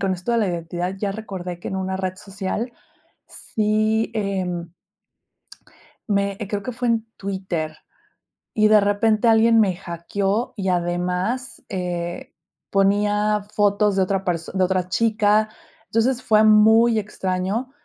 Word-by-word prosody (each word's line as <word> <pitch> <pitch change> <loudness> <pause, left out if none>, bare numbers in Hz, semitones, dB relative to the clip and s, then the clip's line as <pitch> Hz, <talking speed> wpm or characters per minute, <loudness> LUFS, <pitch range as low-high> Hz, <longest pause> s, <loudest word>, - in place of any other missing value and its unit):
Con 195 0 +1
esto 185 +7 -3
de 235 - +3
la 210 - +2
identidad 175 +2 -3
ya 200 0 -2
recordé 185 -5 -6
que - - -6
en 190 - -3
una 190 0 -2
red 185 -1 -3
social, 200 +5 -4 0.6
sí, 215 +1 0
em. 180 -5 -2 1.4
Me 200 -1 0
creo 205 -1 -3
que 250 - -4
fue 245 +1 -3
en 230 -1 +1
Twitter, 190 -5 -3 0.8
y 215 -1 +3
de 215 0 +7
repente 215 +3 +2
alguien 225 0 +5
me 195 -4 +3
hackeó 195 +5 -2
y 190 -2 -2
además, 180 +8 -1
eh, 175 -2 -4 0.4
ponía 205 +1 +2
fotos 205 -1 +2
de 190 - +3
otra 195 0 0
person 175 0 -3
de 185 - +4
otra 185 -1 0
chica. 215 0 +2 0.4
Entonces 245 +3 +1
fue 215 -3 +4
muy 220 +2 +6
extraño 195 +4 -2
200 Hz, 140 wpm, -22 LUFS, 185-215 Hz, 1.4 s, de